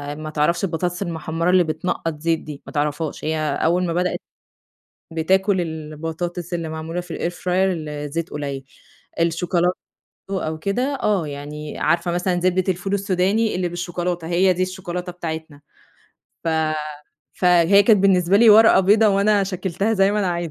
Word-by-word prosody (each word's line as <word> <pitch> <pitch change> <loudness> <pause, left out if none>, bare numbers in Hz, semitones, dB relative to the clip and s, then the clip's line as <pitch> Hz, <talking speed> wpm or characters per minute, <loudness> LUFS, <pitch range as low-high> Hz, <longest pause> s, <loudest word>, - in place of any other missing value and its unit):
ما 155 +1 -6
تعرفش 155 +4 0
البطاطس 175 0 -2
المحمرة 165 -1 -2
اللي 185 -1 +5
بتنقط 160 -1 -3
زيت 165 0 +1
دي، 150 -2 -9
ما - - -10
تعرفهاش، 150 +1 -2
هي 155 0 0 0.3
أول 175 +3 +2
ما 165 - -1
بدأت 180 +1 0 0.9
بتاكل 190 +4 +2
البطاطس 165 +2 -5
اللي 165 -2 -3
معمولة 160 +2 -4
في 175 -1 -7
الair 175 - -2
fryer - - -15
الزيت 165 -4 -1
قليل، 140 -2 -5 0.6
الشوكولاتة 175 +2 +1 0.5
برضو 195 -1 -1
أو 155 0 -4
كده، 250 - -1
آه 195 -7 +1
يعني 150 +1 -7
عارفة 170 +2 +1
مثلًا 180 +1 0
زبدة 185 +1 +1
الفول 185 +2 -2
السوداني 200 +3 +1
اللي 180 -1 -1
بالشوكولاتة 175 -1 -3
هي 185 +2 +3
دي 180 +1 0
الشوكولاتة 180 -1 -5
بتاعتنا، 160 -4 -6 0.8
ف - - 0 0.9
فهي 180 +2 +5
كانت 210 -1 +5
بالنسبة 190 -1 +3
لي 225 +1 +7
ورقة 220 -1 +7
بيضا 205 +4 +4
وأنا 200 0 +3
شكّلتها 190 +2 -2
زي 195 -1 +3
ما 210 - 0
أنا 195 -3 +1
عايزة 170 -1 -2
175 Hz, 155 wpm, -21 LUFS, 160-190 Hz, 0.9 s, لي